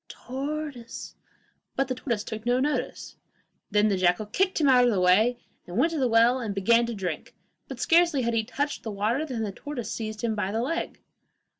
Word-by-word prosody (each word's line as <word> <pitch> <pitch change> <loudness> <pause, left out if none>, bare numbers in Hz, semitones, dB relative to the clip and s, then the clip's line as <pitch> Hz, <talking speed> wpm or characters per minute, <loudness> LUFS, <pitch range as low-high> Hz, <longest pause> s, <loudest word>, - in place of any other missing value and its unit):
tortoise!' 275 -2 -6 0.6
but 270 - +1
the 255 - -1
tortoise 235 -4 -3
took 220 -1 -6
no 245 +1 +2
notice. 295 +3 -2 0.5
Then 210 0 +3
the 200 -2 +1
jackal 180 +3 +2
kicked 375 - 0
him 295 - +3
out 250 -2 +6
of 245 - +4
the 205 -5 +1
way, 205 +7 +4 0.3
and 175 - -6
went 330 - +3
to 320 - -2
the 260 - +2
well 235 +2 +4
and 215 -5 -4
began 230 +4 +3
to 235 - -4
drink, 180 -6 -5 0.3
but - - -8
scarcely 335 -6 +3
had 235 0 0
he 225 -1 +1
touched 290 +6 -3
the 225 - -6
water, 220 +9 -1
than 240 -5 -3
the 205 - -3
tortoise 265 +3 -6
seized 215 -1 -5
him 230 -2 +1
by 205 -2 -2
the 225 +2 -1
leg. 330 +6 -3
235 Hz, 205 wpm, -26 LUFS, 210-270 Hz, 0.6 s, out